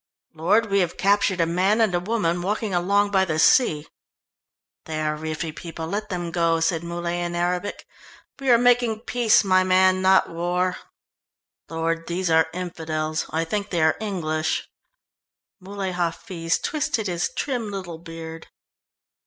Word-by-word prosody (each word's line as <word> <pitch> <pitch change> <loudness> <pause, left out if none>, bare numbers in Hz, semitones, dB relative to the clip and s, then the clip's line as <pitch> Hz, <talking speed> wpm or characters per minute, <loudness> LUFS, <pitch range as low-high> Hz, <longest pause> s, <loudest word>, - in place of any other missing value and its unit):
"Lord, 200 +7 +1
we 200 - +3
have 175 -3 -1
captured 200 -1 +2
a 165 - +4
man 185 +6 +1
and 220 -5 +3
a 175 - +2
woman 180 -3 -1
walking 210 +2 -2
along 200 +3 +2
by 190 -1 +3
the 160 -4 -1
sea." 155 - +4 1.0
"They 155 -1 -4
are 155 0 -1
Riffi 155 +1 -5
people 165 -1 -7
let 210 +5 -4
them 175 -3 -3
go," 165 -1 +1
said 165 0 0
Muley 170 0 -3
in 175 0 -3
Arabic. 180 +3 -2 0.5
"We 270 -1 -2
are 240 - +7
making 240 -2 +2
peace, 240 -3 +3
my 185 -1 +4
man, 185 0 +4
not 190 0 +4
war." 180 +2 -1 0.9
"Lord, 165 +1 -2
these 175 0 -1
are 160 0 +4
infidels; 160 -3 -3
I 160 +1 -1
think 205 +4 -3
they 170 -3 0
are 160 - +3
English." 160 -7 -2 0.9
Muley 195 0 -5
Hafiz 170 0 -2
twisted 290 -7 -2
his 175 -3 -1
trim 245 -6 -2
little 185 -5 -6
beard. 165 -1 -9
180 Hz, 155 wpm, -23 LUFS, 165-200 Hz, 1.0 s, are